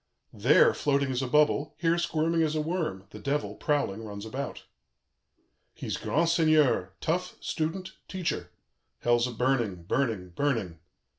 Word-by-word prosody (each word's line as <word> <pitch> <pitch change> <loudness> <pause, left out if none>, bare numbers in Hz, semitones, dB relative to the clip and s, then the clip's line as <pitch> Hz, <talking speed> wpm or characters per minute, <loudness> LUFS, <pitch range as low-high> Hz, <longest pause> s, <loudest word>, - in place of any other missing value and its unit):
"There 480 -2 +5
floating 140 -2 +1
as 130 0 -1
a 130 - -1
bubble, 150 +1 +2
here 165 +1 +2
squirming 165 0 +1
as 155 -1 +1
a - - +1
worm, 155 - -2
the 105 - -9
Devil, 145 +6 -1
prowling, 130 -8 -1
runs 100 -1 -7
about. 135 +5 -5 1.1
"He's - - -4
grand 165 +3 +1
seigneur, 155 - +3
tough, 180 +3 -1
student, 180 +4 -3 0.2
teacher. 165 - -3 0.5
Hell's 120 0 +3
a - - -5
burning, 120 -7 0
burning, 110 -3 -1
burning. 100 - -1
140 Hz, 140 wpm, -28 LUFS, 110-160 Hz, 1.1 s, There